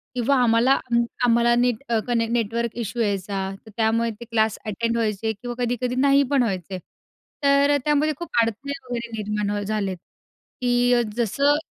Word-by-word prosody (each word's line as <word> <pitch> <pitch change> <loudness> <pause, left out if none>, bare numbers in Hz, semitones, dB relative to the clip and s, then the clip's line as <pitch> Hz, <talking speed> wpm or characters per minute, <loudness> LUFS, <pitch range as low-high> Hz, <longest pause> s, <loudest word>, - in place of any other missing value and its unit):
किंवा 250 +3 +2
आम्हाला 235 +3 +4
अ, 235 -3 -3 0.3
आम्हाला 235 0 +4
नीट 245 0 +1 0.2
कनेक्ट 230 -1 0
नेटवर्क 235 0 -1
इशू 235 +3 -5
यायचा, 195 -2 -1 0.2
तर 220 - -13
त्यामुळे 230 +1 +2
ते 235 - -8
क्लास 220 -2 +1
अटेंड 230 +2 -1
व्हायचे 220 -1 -1
किंवा 240 +3 -7
कधी-कधी 245 +1 -1
नाही 275 +1 +4
पण 275 -3 +4
व्हायचे. 190 -4 -3 0.7
तर 280 0 +4
अ, - - +3
त्यामध्ये 300 +1 +2
खूप 345 -2 -7
अडचणी 230 +5 -2 0.2
वगैरे 235 -1 -4
निर्माण 210 0 -2
अ, - - -2
झालेत 200 -3 -2 0.6
की 245 0 +3
जसं 275 +6 +2
235 Hz, 160 wpm, -23 LUFS, 215-245 Hz, 0.7 s, आम्हाला